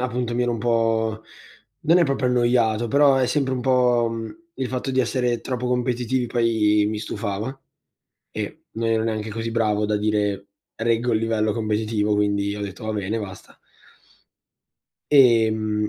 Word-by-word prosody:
appunto 125 -1 -2
mi 125 - +1
ero 120 - 0
un 115 - -3
po' 110 -1 0 0.6
non 165 +3 +4
è 175 - +4
proprio 140 -3 0
annoiato, 120 -2 +2
però 140 +2 +5
è 130 -1 +2
sempre 135 -1 0
un 125 - -3
po', 125 -2 +3
uhm, 115 +3 -6 0.2
il 130 -4 -3
fatto 130 +1 -3
di 130 - -1
essere 120 -1 0
troppo 125 +1 -3
competitivi 125 0 0
poi 110 -3 +2
mi 110 0 -3
stufava 110 +3 -4 0.8
e - - -6
non 115 0 -2
ero 110 0 +1
neanche 110 -1 -3
così 115 +2 -4
bravo 105 -2 +1
da 105 0 0
dire: 105 -2 -1 0.3
"Reggo 115 +1 0
il 110 - +3
livello 110 -1 0
competitivo", 110 -1 -1
quindi 100 0 0
ho - - -6
detto: 100 +1 -7
"Va 110 - -2
bene, 105 +1 -2
basta". 95 -3 -10 1.5
Ehm, 110 -5 +4
115 Hz, 160 wpm, -23 LUFS, 105-125 Hz, 1.5 s, però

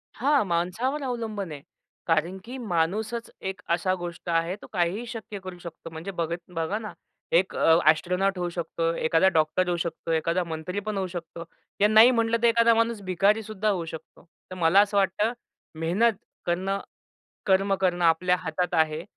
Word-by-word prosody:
हां, 280 +2 +3
माणसावर 200 - -1
अवलंबून 220 -7 -4
आहे. 145 -2 -7 0.5
कारण 165 +3 +1
की 250 +3 -8
माणूसच 215 +3 -1 0.2
एक 190 - -7
असा 175 +2 +1
गोष्ट 175 -1 -7
आहे 165 +2 +1
तो - - -11
काहीही 185 +5 0
शक्य 220 -3 -7
करू 185 -1 -7
शकतो. 170 -1 -9
म्हणजे 160 +4 -7
बघत 170 -2 -2 0.2
बघा 165 +5 -1
ना. 215 -1 -7 0.4
एक 185 +3 +2
अ, 165 0 +5
एस्ट्रोनॉट 180 +4 -1
होऊ 175 -1 -1
शकतो. 165 -1 -2
एखादा 165 +3 +3
डॉक्टर 155 +4 +2
होऊ 175 -1 0
शकतो, 165 0 -4
एखादा 165 +3 +1
मंत्री 170 +3 -4
पण 210 0 -4
होऊ 190 -1 -1
शकतो. 170 -1 -7 0.4
या 205 - +7
नाही 220 +3 +7
म्हटलं 230 -1 +2
तर - - +7
एखादा 230 0 +5
माणूस 230 -1 +1
भिकारीसुद्धा 210 +3 +1
होऊ 180 -5 -1
शकतो. 160 +1 -10 0.3
तर - - -5
मला 175 +2 +4
असं 205 0 0
वाटतं 200 +4 +1 0.5
मेहनत 195 +9 +2 0.3
करणं, 190 +3 -1 0.7
कर्म 195 +1 +3
करणं 180 -2 0
आपल्या 180 +2 +3
हातात 180 0 -3
आहे. 160 0 +1
185 Hz, 170 wpm, -26 LUFS, 170-215 Hz, 0.7 s, या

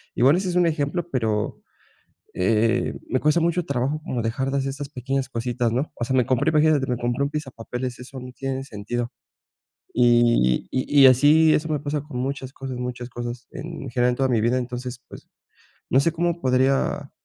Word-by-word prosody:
Igual 135 +6 +5
ese 185 -1 -2
es 175 - -3
un 175 -1 +4
ejemplo, 165 +2 -1
pero, 110 -5 -1 0.7
eh, 115 +5 +1 0.2
me 130 - +1
cuesta 150 +3 +3
mucho 170 +1 +1
trabajo 140 +2 -1
como 120 -2 -2
dejar 130 +4 -1
de 140 - 0
hacer 135 0 -1
esas 140 +1 -5
pequeñas 135 -1 -2
cositas, 120 -1 -1
¿no? 135 +5 -1
O 120 - -4
sea, 130 +1 -1
me 125 - +3
compré, 135 +5 +2
imagínate, 150 -3 +3
me 125 - 0
compré 120 +3 -1
un 140 - 0
pisapapeles, 125 -4 -5
eso 130 +1 -9
no 125 0 -9
tiene 135 0 -4
sentido. 120 +1 -4 0.8
Y 120 - +3
y 140 +2 +3
y - - +10
así 150 +5 +5
eso 155 +1 0
me 150 -1 0
pasa 145 0 -2
con 145 -4 -7
muchas 135 0 -3
cosas 135 -2 -6
muchas 125 -1 -5
cosas 120 0 -6
en 165 +4 -7
general 125 +1 +2
en 125 - -2
toda 135 -1 +1
mi 120 -3 +2
vida, 120 +3 +2
entonces, 125 0 -5
pues, - - -12 0.6
no 130 - +4
sé, 165 +4 +2
cómo 170 +1 -1
podría, 135 +2 +1
130 Hz, 195 wpm, -23 LUFS, 120-145 Hz, 0.8 s, y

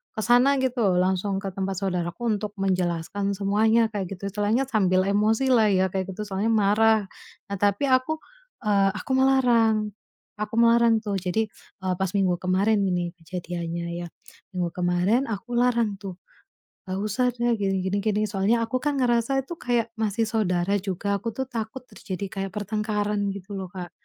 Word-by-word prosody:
ke 220 - -2
sana 245 +4 +5
gitu 245 -7 +1
langsung 190 +2 +1
ke 195 - -2
tempat 190 0 -3
saudaraku 180 +1 -2
untuk 205 0 -5
menjelaskan 190 +1 -1
semuanya, 220 +3 +3
kayak 195 -2 -4
gitu 200 +1 -5
istilahnya 210 +5 +1
sambil 185 -5 +3
emosilah 220 +3 +3
ya 190 -1 +3
kayak 190 0 -2
gitu, 210 - -4
soalnya 200 +2 -1
marah. 220 +1 +4 0.5
Nah 200 - -2
tapi 205 +6 +2
aku, 260 +5 +2 0.5
eee, 200 -2 +3
aku - - -6
melarang, 235 -5 +3 0.5
aku 210 0 -4
melarang 230 -1 +5
tuh, 205 -2 -2
jadi, 190 +5 -1 0.4
eee, 185 -1 0
pas 190 -1 0
minggu 190 -3 +2
kemarin 195 +4 +2
ini 175 -2 0
kejadiannya 170 0 -5 0.2
ya, - - -7 0.5
minggu 175 -1 0
kemarin 180 +8 +1
aku 225 +2 -5
larang 235 -4 +2
tuh, 190 -2 -7 0.7
"Nggak 185 0 -3
usah 220 +4 0
deh, 240 0 +1
gini 195 -1 0
gini 190 +2 0
gini," 210 0 +1
soalnya 210 +4 +1
aku 255 +3 -1
kan 290 -1 0
ngerasa 240 +2 +2
itu 305 +6 -7
kayak 235 -2 0
masih 220 +1 0
saudara 190 -4 +1
juga, 200 +1 -1
aku 230 - -3
tuh 265 - -2
takut 230 +1 -5
terjadi 190 +1 -6
kayak 195 0 -4
pertengkaran 210 0 -1 0.2
gitu 200 +1 -8
loh, 190 - -4
Kak. 180 -2 -7
205 Hz, 165 wpm, -25 LUFS, 190-230 Hz, 0.7 s, sana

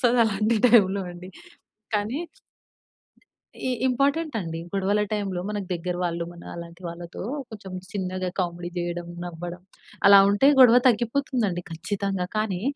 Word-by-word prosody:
వస్తది 245 -1 +3
అలాంటి 215 +2 +1
టైమ్‌లో 200 -5 +5
అండి. 180 +1 -10 0.7
కానీ 210 +7 0 1.5
ఇ - - +1 0.2
ఇంపార్టెంట్ 280 +5 +1
అండి. 165 -3 -5
గొడవల 200 +1 +1
టైమ్‌లో 195 -4 -2
మన 210 - -2 0.2
దగ్గర 175 +1 -3
వాళ్ళు 170 -1 -1
మన 175 - -13
అలాంటి 170 +1 -9
వాళ్ళతో 170 0 -8 0.3
కొంచెం 200 -4 -9 0.2
చిన్నగా 185 -2 -3
కామెడీ 175 -1 -2
చేయడం 175 0 -3 0.2
నవ్వడం 175 +1 -7 0.4
అలా 200 0 +10
ఉంటే 205 +7 +4
గొడవ 245 -1 +9
తగ్గిపోతుంది 240 +1 +1
అండి 175 0 -3
ఖచ్చితంగా. 195 +2 -2
కానీ 200 -4 -1
195 Hz, 130 wpm, -25 LUFS, 175-220 Hz, 1.5 s, అలా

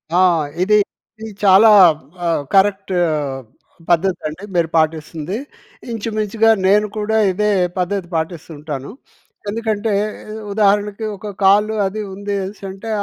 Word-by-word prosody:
ఆ! - - +4 0.4
ఇది 210 +3 +4 0.4
ఇది 220 0 -7
చాలా 200 +3 +7 0.6
ఆ! - - +1 0.3
కరెక్ట్ 195 0 +2 0.2
ఆహ్, 145 -4 -2 0.5
పద్ధతి 175 +2 +2
అండి 155 +6 -8
మీరు 170 -2 +1
పాటిస్తుంది. 160 +3 -1 0.5
ఇంచుమించుగా 220 0 0 0.2
నేను 210 +2 +4
కూడా 215 +1 0
ఇదే 210 +3 0 0.3
పద్ధతి 180 0 -2
పాటిస్తూ 160 0 -4
ఉంటాను. 145 -1 -6 0.6
ఎందుకంటే 220 0 -2 0.6
ఉదాహరణకి 205 +1 +1
ఒక 210 - -9 0.2
కాల్ 205 +2 +5 0.2
అది 215 +3 -5
ఉందేసంటే 200 +1 -5
195 Hz, 110 wpm, -18 LUFS, 175-210 Hz, 0.6 s, చాలా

